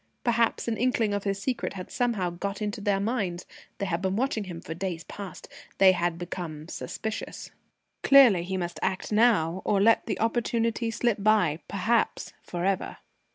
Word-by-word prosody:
Perhaps 235 -1 +1
an 225 -2 -1
inkling 230 -4 +1
of 205 0 -2
his 200 0 -1
secret 250 +4 -2
had 185 -2 -8
somehow 220 -8 0
got 195 +3 -4
into 210 -1 -3
their 200 -1 +1
minds. 200 -5 -2 0.3
They 200 - -2
had 175 -2 -1
been 190 0 0
watching 230 -3 -1
him 175 -3 -7
for 160 - -6
days 170 -1 -4
past. 200 0 -9 0.3
They 190 -1 +7
had 175 -2 -1
become 170 -3 -6
suspicious. 220 +4 -5 0.5
Clearly, 255 -10 +7
he 190 +2 -3
must 175 -3 -4
act 190 +2 -2
now, 205 -6 +3
or 205 - +2
let 225 +3 +4
the - - -2
opportunity 230 0 0
slip 225 -2 0
by 200 -7 +3
perhaps 220 +4 0
for 175 0 -4
ever. 195 -1 -1
200 Hz, 170 wpm, -27 LUFS, 180-225 Hz, 0.5 s, They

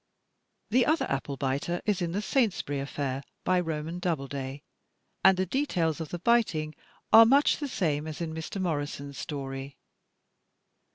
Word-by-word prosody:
The 245 +1 +4
other 315 +2 +2
apple 135 0 -2
biter 140 +6 -1
is 205 -3 +1
in 170 -1 -1
"The 200 +4 -2
Saintsbury 210 - 0
Affair," 135 -1 -3 0.2
by 185 0 +3
Roman 165 0 -3
Doubleday, 140 -5 -3 0.6
and 190 -1 +7
the 185 - +1
details 175 - 0
of 160 - -5
the 175 - -4
biting 175 -7 +2 0.4
are 225 - +11
much 275 +6 +4
the 290 - -3
same 155 - -1
as 155 - -6
in 165 -2 -3
Mr. 160 +5 -5
Morrison's 145 -5 -3
story. 135 -1 -5
160 Hz, 150 wpm, -28 LUFS, 140-190 Hz, 0.6 s, are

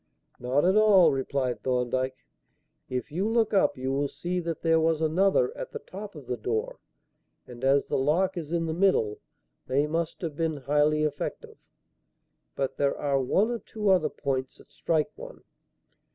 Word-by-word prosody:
"Not 130 +5 +1
at 190 +2 +4
all," 210 -4 +6
replied 135 -2 -2
Thorndyke. 130 +1 -1 0.6
"If 130 +3 -4
you 185 +7 -1
look 225 -2 +1
up 195 - +3
you 130 +1 -2
will 140 +1 0
see 175 +6 -3
that 165 -2 -4
there 165 -1 +4
was 160 -1 +2
another 160 -4 +2
at - - -7
the - - -3
top 200 +6 -9
of 145 -4 -10
the 125 0 -3
door, 110 0 -3 0.7
and, 125 0 -12
as 135 +1 +3
the - - -1
lock 175 +8 +1
is 165 -3 -6
in 170 -1 0
the 160 - -2
middle, 170 - +2 0.5
they 140 +3 +2
must 165 +2 -3
have 160 -5 -4
been 160 -1 -1
highly 150 +3 +2
effective. 145 -1 -4 1.0
But 135 -1 -2
there 140 -1 +1
are 140 -2 0
one 200 - +2
or 235 - -2
two 210 -2 -3
other 170 -5 +3
points 130 -3 -3
that - - -20
strike 160 +4 0
one. - - -11
150 Hz, 175 wpm, -27 LUFS, 135-180 Hz, 1.0 s, all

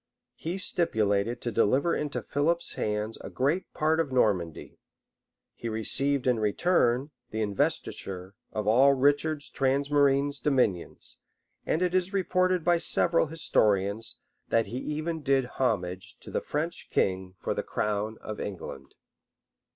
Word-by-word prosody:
He 170 +4 -4
stipulated 110 - +1
to 120 - -2
deliver 130 +9 +2
into 150 -1 -3
Philip's 165 +4 0
hands 105 +1 -2
a - - -7
great 145 +8 0
part 160 +1 +1
of 155 -5 0
Normandy:[*] 95 -10 0 0.7
he 115 - -5
received, 135 +5 0
in 125 -3 +2
return, 125 - +2 0.2
the 110 0 -2
investiture 95 -2 -2 0.2
of 105 -1 -3
all 130 +6 +6
Richard's 145 +2 +2
transmarine 140 +1 +2
dominions; 125 - 0 0.5
and 165 - +1
it 180 -1 0
is 185 +1 +1
reported 185 -2 +2
by 175 +1 +4
several 170 0 +2
historians, 105 -8 +1 0.3
that 115 0 +3
he 120 +6 -5
even 155 +3 -3
did 135 -2 +2
homage 95 -8 -2
to - - -10
the - - -1
French 160 +4 -3
king 95 -1 0
for - - -2
the - - -2
crown 105 +1 -2
of 110 -1 -6
England. 95 -4 -7
130 Hz, 135 wpm, -28 LUFS, 105-155 Hz, 0.7 s, all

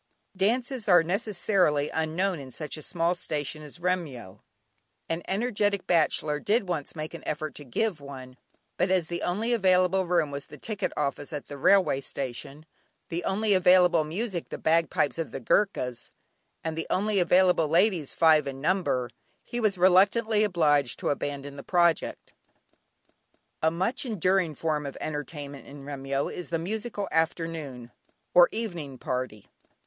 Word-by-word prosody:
Dances 235 +4 0
are 175 -2 +7
necessarily 180 -5 +1
unknown 165 +3 -1
in 135 -2 -9
such 150 +3 -6
a 155 - -8
small 170 +2 0
station 155 -4 -4
as 150 +2 -10
Remyo. 145 - -3 0.7
An 165 +1 -2
energetic 205 -2 0
bachelor 155 -3 +2
did 205 +4 +1
once 165 -5 -3
make 155 0 -5
an - - -7
effort 155 0 -3
to 145 - -9
give 155 - -1
one, 130 -2 -10 0.4
but 185 - +1
as 185 -3 +2
the 175 0 -3
only 215 +7 0
available 185 -3 +3
room 170 -4 +1
was 140 0 -5
the - - -12
ticket 215 -3 -3
office 145 -1 -2
at 150 -2 -6
the 145 - -6
railway 185 -4 +4
station, 135 +3 -6 0.4
the 170 +1 -3
only 205 +2 +1
available 180 -3 +5
music 180 +3 -4
the - - -5
bagpipes 165 -1 +1
of 165 - -2
the - - -6
Goorkhas, 125 - 0 0.5
and 160 -1 -3
the 165 - -4
only 205 +1 +1
available 180 -2 +4
ladies 170 -2 +2
five 155 -3 +5
in 135 -1 -5
number, 155 -6 0 0.4
he 240 - -5
was 215 -4 +1
reluctantly 205 +4 +4
obliged 150 - +2
to - - -1
abandon 140 0 -4
the - - -6
project. 170 -2 +1 1.3
A 160 - +4
much 190 +10 -1
enduring 190 - +1
form 150 -1 -1
of 140 - -7
entertainment 145 -1 -6
in 140 0 -11
Remyo 140 -1 -2
is 180 - -7
the 165 - 0
musical 205 +4 -4
afternoon, 160 -7 -2 0.4
or 175 -1 +7
evening 175 - -5
party. 125 -5 -4
165 Hz, 155 wpm, -27 LUFS, 145-190 Hz, 1.3 s, are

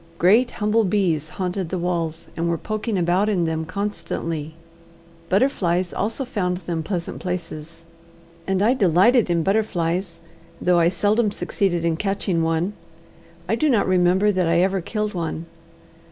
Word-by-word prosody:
Great 220 +9 +4
humble 215 +1 +2
bees 175 -6 0
haunted 185 -2 -3
the 185 - -2
walls, 170 -2 -2
and 170 +1 -1
were 170 - 0
poking 215 +2 -3
about 180 +4 +2
in 180 -5 +1
them 160 0 -2
constantly. 165 -5 -4 0.7
Butterflies 185 -6 +1
also 225 +7 -2
found 180 -7 -1
them 170 -2 -3
pleasant 170 0 -4
places, 165 -3 -6 0.6
and 190 0 +1
I 235 +4 +4
delighted 205 +1 +4
in 170 -1 +1
butterflies, 180 -3 -1 0.4
though 180 -1 +3
I 170 0 +4
seldom 210 +5 +1
succeeded 180 -4 -1
in 165 -1 +1
catching 195 -3 -1
one. 165 +4 0 0.7
I - - 0
do 310 - +2
not 230 -6 +2
remember 185 +2 +3
that 185 -3 +1
I 170 +1 +3
ever 190 0 +1
killed 210 +3 -3
one. 165 -2 -3
180 Hz, 150 wpm, -22 LUFS, 170-205 Hz, 0.7 s, Great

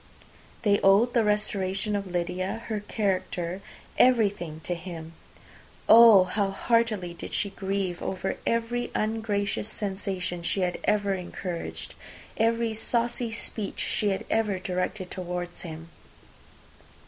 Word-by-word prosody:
They 205 -2 +4
owed 205 +5 +5
the 235 - +4
restoration 210 -1 0
of 200 -1 -2
Lydia, 180 +4 -2
her 215 -2 -1
character, 190 -3 -2 0.4
everything 205 -10 +3
to 175 - -2
him. 170 -2 -7 0.7
Oh, 225 -4 +9
how 195 +2 0
heartily 215 -3 +1
did 170 - -6
she 200 - 0
grieve 190 -2 -2
over 190 0 -2
every 230 +1 0
ungracious 215 -2 -1
sensation 190 -4 -3
she 180 +3 0
had 180 -1 -1
ever 205 -1 +2
encouraged, 180 -1 -5 0.4
every 230 0 +1
saucy 235 +2 -1
speech 215 -2 -4
she 210 - +1
had 195 - -2
ever 215 -3 +1
directed 185 +1 -3
towards 180 -1 -5
him! 165 -1 -8
200 Hz, 120 wpm, -27 LUFS, 180-220 Hz, 0.7 s, Oh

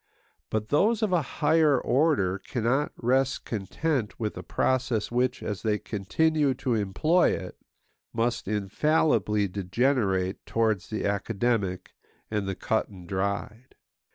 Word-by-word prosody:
But 110 0 -2
those 215 +9 +3
of 205 -4 +1
a 175 - +4
higher 150 0 +2
order 125 - +2
cannot 125 +7 -1
rest 130 +2 +1
content 115 - -2
with 110 -2 -2
a - - -6
process 125 -5 0
which, 125 +1 0
as 105 -4 -4
they 105 -2 +1
continue 140 +9 0
to 125 -1 -1
employ 115 - +2
it, - - -6 0.6
must 120 -2 -1
infallibly 105 0 +1
degenerate 95 0 0
towards 110 -5 0
the 110 - -3
academic 100 -1 -1 0.4
and 105 -2 -1
the 95 - -2
cut 110 - -1
and 90 -4 -12
dried. 100 +6 -3
115 Hz, 125 wpm, -27 LUFS, 100-135 Hz, 0.6 s, a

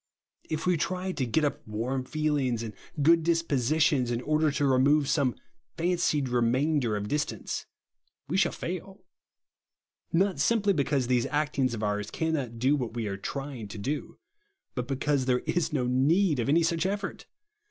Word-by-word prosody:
If 155 - -2
we 180 -2 +3
try 185 +3 -2
to 140 -7 -2
get 150 +7 +1
np 145 -2 +1
warm 125 +5 -2
feelings 140 -5 0
and 110 -2 -6 0.3
good 165 +2 +6
dispositions 155 -4 +2
in 120 -1 -1
order 155 +3 +2
to 145 0 0
remove 140 +2 +4
some 140 -3 +1 0.4
fancied 170 -5 +1
remainder 125 +1 +1
of 105 0 -4
distance, 150 +6 -3 0.6
we 160 - -2
shall 190 -2 +3
fail; 185 +2 -6 1.1
not 190 +1 +2
sii 230 +12 +3
aply 200 -2 +2
because 140 -2 +1
these 125 +1 +1
actings 140 -4 0
of 110 - -5
ours 105 0 -1
cannot 140 -7 -2
do 130 +5 +3
what 120 -5 -3
we 115 -2 -2
are 100 -1 -2
trying 135 +2 -5
to 100 - -8
do, 140 +9 -4 0.6
but 125 -1 -3
because 140 0 0
there 125 -1 +1
is 175 -2 0
no 135 -5 0
need 145 +6 +3
of 120 - 0
any 165 +4 +4
such 165 +2 +1
effort. 200 +1 -4
140 Hz, 165 wpm, -28 LUFS, 125-160 Hz, 1.1 s, good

